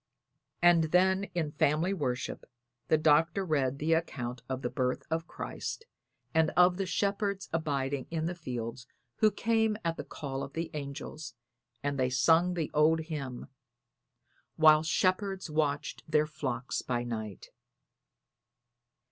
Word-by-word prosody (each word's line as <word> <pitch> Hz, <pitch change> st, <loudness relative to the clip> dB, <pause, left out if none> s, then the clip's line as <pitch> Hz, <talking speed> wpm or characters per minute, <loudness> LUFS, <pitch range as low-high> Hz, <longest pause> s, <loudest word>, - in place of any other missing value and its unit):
And 175 Hz, -2 st, +6 dB
then 190 Hz, +4 st, +3 dB
in 160 Hz, -4 st, -1 dB
family 155 Hz, +5 st, +2 dB
worship 135 Hz, -7 st, -3 dB, 0.4 s
the 155 Hz, -, +4 dB
Doctor 160 Hz, +5 st, +3 dB
read 140 Hz, -5 st, +1 dB
the 155 Hz, +3 st, +1 dB
account 125 Hz, -7 st, -2 dB
of 130 Hz, 0 st, -3 dB
the 120 Hz, -, 0 dB
birth 125 Hz, -2 st, -1 dB
of 165 Hz, 0 st, -1 dB
Christ 455 Hz, -, -5 dB, 0.5 s
and 160 Hz, -1 st, +4 dB
of 180 Hz, 0 st, +6 dB
the 195 Hz, -1 st, -2 dB
shepherds 200 Hz, +1 st, -1 dB
abiding 140 Hz, -4 st, -1 dB
in 160 Hz, -1 st, -2 dB
the 175 Hz, -, -1 dB
fields 125 Hz, -7 st, -6 dB, 0.3 s
who 215 Hz, -, +5 dB
came 220 Hz, +1 st, +1 dB
at 165 Hz, 0 st, 0 dB
the -, -, -4 dB
call 135 Hz, -2 st, -5 dB
of 140 Hz, 0 st, -6 dB
the 165 Hz, 0 st, -3 dB
angels, 140 Hz, -2 st, -6 dB, 0.5 s
and 145 Hz, -1 st, -1 dB
they 130 Hz, 0 st, +2 dB
sung 165 Hz, +7 st, +3 dB
the 165 Hz, -4 st, -2 dB
old 155 Hz, +2 st, +4 dB
hymn: 145 Hz, -6 st, -5 dB, 1.1 s
"While 155 Hz, -1 st, +7 dB
shepherds 185 Hz, +2 st, 0 dB
watched 150 Hz, -2 st, -1 dB
their 155 Hz, -1 st, +3 dB
flocks 135 Hz, -5 st, -3 dB
by 120 Hz, -1 st, -2 dB
night." 110 Hz, -5 st, -6 dB
155 Hz, 140 wpm, -30 LUFS, 135-175 Hz, 1.1 s, While